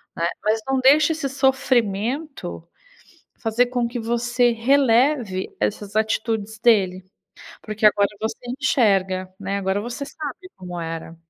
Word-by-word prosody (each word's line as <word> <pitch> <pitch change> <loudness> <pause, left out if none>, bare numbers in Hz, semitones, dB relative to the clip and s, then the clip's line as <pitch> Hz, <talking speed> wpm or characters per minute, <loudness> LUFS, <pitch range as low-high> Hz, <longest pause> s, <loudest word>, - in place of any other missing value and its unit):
né, 170 - 0 0.2
mas 220 +1 +1
não 270 0 +1
deixa 290 +4 +5
esse 315 -3 -2
sofrimento 260 - -1 0.7
fazer 225 +2 +2
com 245 -1 -1
que 240 0 -5
você 240 +1 +1
releve 240 -4 +2
essas 205 0 -2
atitudes 220 0 -1
dele, 195 -5 +3 0.6
porque 215 0 -5
agora 205 -1 +4
você 225 +1 -2 0.2
enxerga, 190 -9 +1
né? 195 0 -3
Agora 195 +1 -1
você 240 +5 -5
sabe 305 +5 -8
como 180 -2 -7
era. 165 0 -6
225 Hz, 125 wpm, -22 LUFS, 200-260 Hz, 0.7 s, deixa